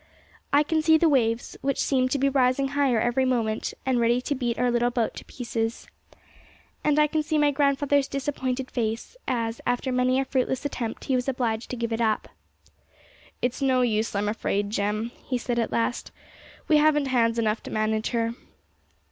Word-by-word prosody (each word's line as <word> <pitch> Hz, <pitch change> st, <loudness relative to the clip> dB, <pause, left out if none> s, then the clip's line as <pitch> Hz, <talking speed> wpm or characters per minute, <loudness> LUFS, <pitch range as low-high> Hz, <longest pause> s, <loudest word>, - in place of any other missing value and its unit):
I 285 Hz, +1 st, +5 dB
can 315 Hz, +1 st, 0 dB
see 320 Hz, 0 st, +5 dB
the 330 Hz, -, +3 dB
waves, 235 Hz, -5 st, +1 dB
which 275 Hz, -1 st, 0 dB
seemed 255 Hz, -2 st, +2 dB
to 280 Hz, -, 0 dB
be 275 Hz, +1 st, +2 dB
rising 270 Hz, 0 st, +2 dB
higher 275 Hz, -5 st, +2 dB
every 240 Hz, +3 st, +1 dB
moment, 230 Hz, -4 st, -1 dB
and 260 Hz, -2 st, +2 dB
ready 235 Hz, +1 st, +3 dB
to 285 Hz, -, -2 dB
beat 245 Hz, -4 st, -2 dB
our 245 Hz, 0 st, +2 dB
little 240 Hz, 0 st, +2 dB
boat 235 Hz, -2 st, -1 dB
to -, -, -8 dB
pieces. 230 Hz, -2 st, -3 dB, 1.0 s
And 300 Hz, -1 st, +2 dB
I 300 Hz, -, +6 dB
can 310 Hz, +1 st, 0 dB
see 305 Hz, +1 st, -1 dB
my 295 Hz, -1 st, +4 dB
grandfather's 280 Hz, 0 st, +2 dB
disappointed 265 Hz, -2 st, -3 dB
face, 225 Hz, -, -3 dB
as, 230 Hz, -3 st, -2 dB
after 245 Hz, +2 st, -1 dB
many 255 Hz, +1 st, +2 dB
a 270 Hz, -, 0 dB
fruitless 260 Hz, +1 st, -1 dB
attempt, 235 Hz, -5 st, -4 dB
he 270 Hz, -, -1 dB
was 250 Hz, +1 st, -1 dB
obliged 235 Hz, -3 st, -2 dB
to -, -, -3 dB
give 230 Hz, -1 st, -2 dB
it 225 Hz, -, -1 dB
up. 220 Hz, -2 st, 0 dB, 1.1 s
'It's 245 Hz, +3 st, -1 dB
no 260 Hz, -2 st, +3 dB
use, 220 Hz, -2 st, 0 dB
I'm 205 Hz, +1 st, 0 dB
afraid, 205 Hz, -1 st, -1 dB
Jem,' 210 Hz, +2 st, -1 dB, 0.2 s
he 255 Hz, -, 0 dB
said 240 Hz, 0 st, -2 dB
at 230 Hz, -, -1 dB
last; 230 Hz, +1 st, -1 dB, 0.6 s
'we 310 Hz, -, +5 dB
haven't 295 Hz, -1 st, +3 dB
hands 230 Hz, -2 st, +2 dB
enough 220 Hz, -1 st, 0 dB
to -, -, -9 dB
manage 215 Hz, 0 st, 0 dB
her.' 230 Hz, -1 st, -1 dB
250 Hz, 190 wpm, -25 LUFS, 230-275 Hz, 1.1 s, I